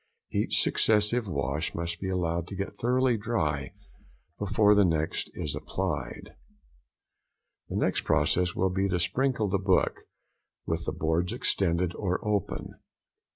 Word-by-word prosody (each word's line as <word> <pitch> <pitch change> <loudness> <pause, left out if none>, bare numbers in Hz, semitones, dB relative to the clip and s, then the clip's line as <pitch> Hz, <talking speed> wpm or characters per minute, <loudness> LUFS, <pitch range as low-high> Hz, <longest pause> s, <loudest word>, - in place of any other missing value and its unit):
Each - - +1
successive 110 +2 +2
wash 70 -1 -2
must 85 0 -3
be 95 - -3
allowed 85 -2 -1
to 100 - -7
get 100 +1 -4
thoroughly 125 0 +2
dry 80 - -1 0.7
before 105 +1 +4
the 100 0 +5
next 80 -3 0
be - - -4
applied. 75 - -4 1.4
The - - -4
next - - +1
process 85 +4 +2
will 95 0 +1
be 95 +1 0
to 90 -1 +1
sprinkle 120 +5 +1
the 100 0 0
book, 95 -1 +2 0.6
with - - -2
the - - +1
boards 80 +3 0
extended 90 -2 +1
or 95 -2 -1
open. 105 -3 -2
95 Hz, 135 wpm, -28 LUFS, 85-105 Hz, 1.4 s, the